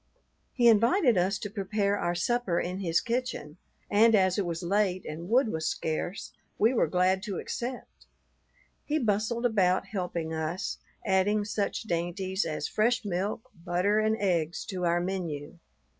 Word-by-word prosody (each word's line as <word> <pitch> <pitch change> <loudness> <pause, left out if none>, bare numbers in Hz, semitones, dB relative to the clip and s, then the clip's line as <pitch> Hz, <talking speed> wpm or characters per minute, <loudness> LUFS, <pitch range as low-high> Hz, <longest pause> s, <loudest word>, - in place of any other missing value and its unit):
He 240 -2 +4
invited 235 - +5
us 190 +3 +2
to 205 - -5
prepare 200 0 0
our 175 -3 -1
supper 195 -1 0
in 180 +2 -3
his 170 -4 +1
kitchen, 235 -10 -3 0.3
and 220 +2 +5
as 185 -1 +3
it 190 - -1
was 170 0 -3
late 185 0 +1
and 165 +4 -6
wood 245 +1 +4
was 160 -4 -2
scarce, 165 +4 -3 0.2
we 225 +4 +3
were 245 - +2
glad 185 +1 +2
to 195 -2 -4
accept. 250 +1 -6 0.8
He 305 - 0
bustled 230 -1 0
about 190 -6 +2
helping 175 -5 -3
us, 160 +5 -3 0.3
adding 205 +1 +2
such 205 +1 -2
dainties 185 +1 -2
as 155 -1 -2
fresh 235 +2 +1
milk, 200 +4 -3
butter, 185 +5 +1
and 220 0 +1
eggs 170 -5 0
to 180 -2 -2
our 170 0 +2
menu. 175 -4 -4
195 Hz, 155 wpm, -28 LUFS, 175-215 Hz, 0.8 s, invited